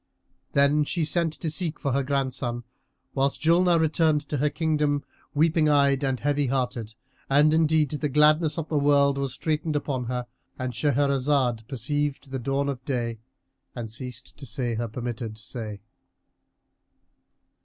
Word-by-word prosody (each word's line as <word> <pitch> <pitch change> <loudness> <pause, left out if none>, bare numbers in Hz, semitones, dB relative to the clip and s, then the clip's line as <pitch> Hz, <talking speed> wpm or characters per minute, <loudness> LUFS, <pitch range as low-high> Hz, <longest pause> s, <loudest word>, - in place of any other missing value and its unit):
Then 140 +2 +4
she 160 +2 -1
sent 170 0 +2
to 160 -1 -4
seek 165 -1 -3
for 140 - -1
her 140 +2 +1
grandson, 130 -3 -2 0.5
whilst 135 0 0
Julnar 170 +1 +4
returned 155 -2 +2
to 145 - -1
her 150 +2 +2
kingdom, 150 -2 0 0.3
weeping 155 0 +3
eyed 140 -1 +3
and 130 -2 0
heavy 145 +3 +1
hearted, 120 -4 -2 0.3
and 145 +3 +5
indeed 160 -2 +3
the 150 0 -2
gladness 150 +3 +4
of 160 -1 -3
the 150 - 0
world 140 -1 +3
was 135 -2 -2
straitened 155 0 -2
upon 135 -4 -2
her.——And 125 +1 -6
Shahrazad 135 -2 +1
perceived 140 +2 -2
the 135 - -2
dawn 135 +3 -1
of 135 -3 -4
day 120 -4 -2 0.6
and 115 -3 -5
ceased 125 +1 -6
to 140 - -9
say 120 -2 -2
her 115 +1 -2
permitted 115 -1 -5
say. 110 -2 -7
140 Hz, 145 wpm, -26 LUFS, 125-150 Hz, 0.6 s, and